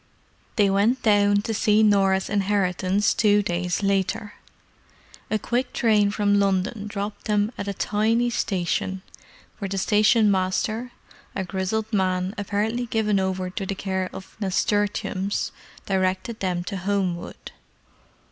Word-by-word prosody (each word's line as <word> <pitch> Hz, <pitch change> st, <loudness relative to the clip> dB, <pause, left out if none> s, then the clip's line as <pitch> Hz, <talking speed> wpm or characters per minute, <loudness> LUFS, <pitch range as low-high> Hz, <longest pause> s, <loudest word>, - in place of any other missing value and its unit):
They 205 Hz, -3 st, +4 dB
went 205 Hz, +6 st, +2 dB
down 205 Hz, -2 st, +4 dB
to 225 Hz, -, -2 dB
see 215 Hz, 0 st, +3 dB
Norah's 195 Hz, -2 st, +3 dB
inheritance 195 Hz, -1 st, +1 dB
two 205 Hz, -1 st, +3 dB
days 180 Hz, +1 st, -1 dB
later. 195 Hz, +1 st, 0 dB, 1.0 s
A 215 Hz, -, +1 dB
quick 245 Hz, +4 st, -2 dB
train 210 Hz, -3 st, +3 dB
from 205 Hz, 0 st, +2 dB
London 200 Hz, +2 st, 0 dB
dropped 205 Hz, 0 st, -5 dB
them 210 Hz, 0 st, +1 dB
at 200 Hz, -, -5 dB
a 200 Hz, -, -1 dB
tiny 225 Hz, +5 st, +1 dB
station, 190 Hz, -2 st, -1 dB, 0.6 s
where 200 Hz, -3 st, -3 dB
the 195 Hz, -, -3 dB
stationmaster, 210 Hz, +2 st, +2 dB, 0.4 s
a 190 Hz, -, -1 dB
grizzled 195 Hz, +4 st, -2 dB
man 185 Hz, -1 st, 0 dB
apparently 215 Hz, +3 st, -1 dB
given 215 Hz, -3 st, +1 dB
over 185 Hz, -1 st, -2 dB
to 195 Hz, -, -4 dB
the 195 Hz, +1 st, -3 dB
care 190 Hz, -1 st, -2 dB
of 190 Hz, -, -10 dB
nasturtiums, 200 Hz, 0 st, -1 dB, 0.3 s
directed 190 Hz, +3 st, -1 dB
them 180 Hz, -2 st, -1 dB
to 195 Hz, +2 st, -5 dB
Homewood. 185 Hz, -2 st, -3 dB
200 Hz, 130 wpm, -24 LUFS, 190-210 Hz, 1.0 s, They